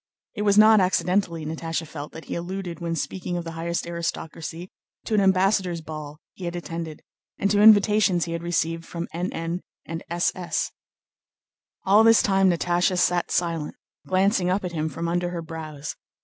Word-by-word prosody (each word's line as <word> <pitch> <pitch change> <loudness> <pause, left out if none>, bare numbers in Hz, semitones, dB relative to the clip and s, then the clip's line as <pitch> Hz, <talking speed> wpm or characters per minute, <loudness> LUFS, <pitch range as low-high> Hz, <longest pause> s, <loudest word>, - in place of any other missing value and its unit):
It - - -4
was 205 -1 +3
not 215 0 +8
accidentally, 180 -3 +1
Natásha 165 +1 -3
felt, 145 -1 -8
that 160 - -9
he - - -5
alluded, 175 -1 -5
when 170 -1 -2
speaking 180 +1 -3
of 175 - -3
the 165 - -6
highest 170 +1 -3
aristocracy, 170 0 -5 0.3
to 225 - -3
an 210 - +4
ambassador's 190 -2 +2
ball 155 -1 -8 0.2
he 185 - -8
had 170 0 -3
attended, 165 -2 -6 0.3
and 200 - +1
to 205 0 +3
invitations 210 -4 +6
he 170 - -6
had 170 0 -3
received 165 -1 -1
from 170 0 -5
N.N. 170 0 -3 0.2
and 165 0 -6
S.S. 175 +1 -1 1.1
All 205 +3 +6
this 225 0 +6
time 195 -1 +4
Natásha 175 +1 +1
sat 180 0 +2
silent, 165 -3 -1 0.3
glancing 190 0 +2
up 185 +1 0
at 180 - -3
him 160 -1 -2
from 165 +2 -4
under 175 +1 0
her 170 -1 -5
brows. 155 -3 -7
175 Hz, 170 wpm, -25 LUFS, 165-190 Hz, 1.1 s, not